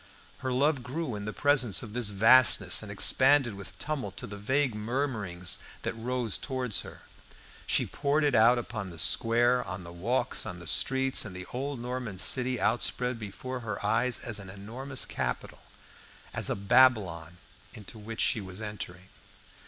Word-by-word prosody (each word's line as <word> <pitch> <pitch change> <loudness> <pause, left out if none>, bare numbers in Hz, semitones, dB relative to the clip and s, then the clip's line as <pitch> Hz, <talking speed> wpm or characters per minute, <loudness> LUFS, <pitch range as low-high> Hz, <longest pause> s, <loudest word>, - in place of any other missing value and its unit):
Her 130 -2 -3
love 140 +2 +1
grew 130 +2 -4
in 105 -1 -5
the 105 - -3
presence 130 -6 +2
of 105 -3 -9
this 120 -3 +1
vastness, 110 +5 +5
and - - -8
expanded 135 -3 +4
with 100 -4 -10
tumult 150 -3 -4
to - - -5
the 105 -3 -8
vague 130 +5 0
murmurings 105 -6 -1 0.2
that - - -2
rose 115 -4 -2
towards 130 -6 -2
her. - - -12 0.6
She - - +2
poured 145 +2 0
it 145 -2 +2
out 115 +2 +5
upon 110 -4 -5
the 85 - -11
square, 120 +6 +3
on 90 0 -7
the 85 0 -10
walks, 120 +8 -1
on 90 - -6
the 85 - -11
streets, 130 +9 +3
and 95 -4 -8
the 95 0 -7
old 135 +1 -4
Norman 125 -4 -5
city 125 +7 +2
outspread 125 +1 0
before 125 +5 -6
her 105 -4 -5
eyes 115 +3 +2
as 115 -4 -4
an 95 -2 -10
enormous 120 +8 -5
capital, - - -4 0.7
as - - 0
a - - 0
Babylon 100 -6 +2 0.4
into 110 0 -11
which 110 +2 -5
she 110 - +2
was 95 0 -9
entering. 95 -4 -7
115 Hz, 170 wpm, -29 LUFS, 100-130 Hz, 0.7 s, vastness